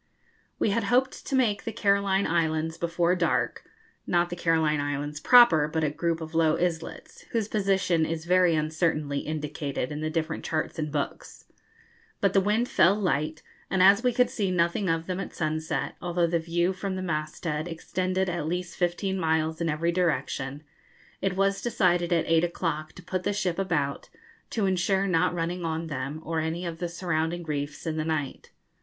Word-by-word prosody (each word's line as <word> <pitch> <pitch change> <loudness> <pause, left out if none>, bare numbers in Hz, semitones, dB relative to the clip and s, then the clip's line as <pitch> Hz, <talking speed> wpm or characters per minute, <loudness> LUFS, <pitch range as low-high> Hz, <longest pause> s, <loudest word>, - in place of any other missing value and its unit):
We 210 - +1
had 225 +1 0
hoped 255 +4 +1
to 275 - 0
make 220 -6 +2
the 225 - -3
Caroline 200 -2 +2
Islands 160 -1 0
before 170 +1 +1
dark 170 -2 0 0.4
(not 175 0 +2
the - - -2
Caroline 160 -3 +2
Islands 145 +1 -3
proper, 235 -10 +7
but 160 +1 -1
a 150 - +1
group 165 +2 -1
of 160 0 -7
low 160 -1 +3
islets, 165 -2 -3
whose 225 -3 0
position 195 -5 +1
is 160 0 -3
very 180 -1 +4
uncertainly 155 -2 0
indicated 150 -3 -3
in 150 +1 -4
the 155 - -1
different 160 0 -2
charts 155 0 -2
and 150 -1 -2
books); 145 -1 -4 0.7
but 200 -2 +2
the 195 - +5
wind 215 +5 +1
fell 190 -3 +4
light, 160 -6 -1 0.3
and 185 -1 +3
as 200 +3 +7
we 250 - +3
could 250 +1 +2
see 200 -4 -1
nothing 175 +2 +1
of 165 0 0
them 185 +1 -3
at 195 - -6
sunset, 155 0 -2
although 175 -1 +1
the 170 0 +1
view 170 +3 0
from 190 0 -4
the 185 - -4
masthead 155 -1 -3
extended 185 +3 -2
at 170 -4 -2
least 180 +1 -3
fifteen 190 +2 -1
miles 160 -1 0
in 165 - 0
every 160 +3 0
direction, 150 -5 -1 0.6
it 195 -1 0
was 195 +1 +1
decided 180 -6 +1
at 170 -2 +2
eight 165 0 +3
o'clock 165 -3 -2
to 180 - -12
put 185 +1 -2
the 205 - -1
ship 185 -4 -1
about, 145 -7 -1 0.4
to 215 -4 0
insure 190 +1 +1
not 180 -1 +2
running 175 +1 -2
on 165 0 -2
them 140 0 -4
or 165 0 -1
any 160 +3 -2
of 165 -1 -5
the 175 -1 -2
surrounding 170 -1 -2
reefs 145 -1 -4
in 160 -1 -2
the 155 - 0
night. 155 -4 -3
170 Hz, 185 wpm, -27 LUFS, 155-185 Hz, 0.7 s, proper